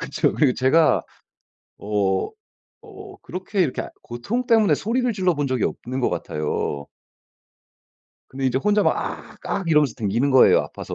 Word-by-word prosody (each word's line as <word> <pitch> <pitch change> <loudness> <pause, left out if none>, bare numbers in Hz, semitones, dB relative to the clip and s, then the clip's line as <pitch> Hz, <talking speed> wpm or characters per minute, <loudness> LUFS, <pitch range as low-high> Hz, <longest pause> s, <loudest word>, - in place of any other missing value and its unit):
그쵸. - - 0
그리고 135 -4 +3
제가 155 +5 +3 0.8
어 100 -2 -1 0.6
어 405 -2 -12
그렇게 190 +2 -3
이렇게 140 - -2 0.2
고통 205 - -3
때문에 225 -3 +4
소리를 245 +3 -1
질러 185 -4 +1
본 145 -2 -2
적이 130 -1 -1
없는 130 +2 -3
것 - - +2
같아요. 75 -1 -3 1.4
근데 135 0 -3
이제 130 +1 +1
혼자 210 +6 +2
막 - - +2
"악악" 190 -4 -5
이러면서 150 -6 +3
다니는 115 +5 0
거예요, 130 - +6
아파서. - - -7
145 Hz, 305 characters per minute, -22 LUFS, 120-205 Hz, 1.4 s, 거예요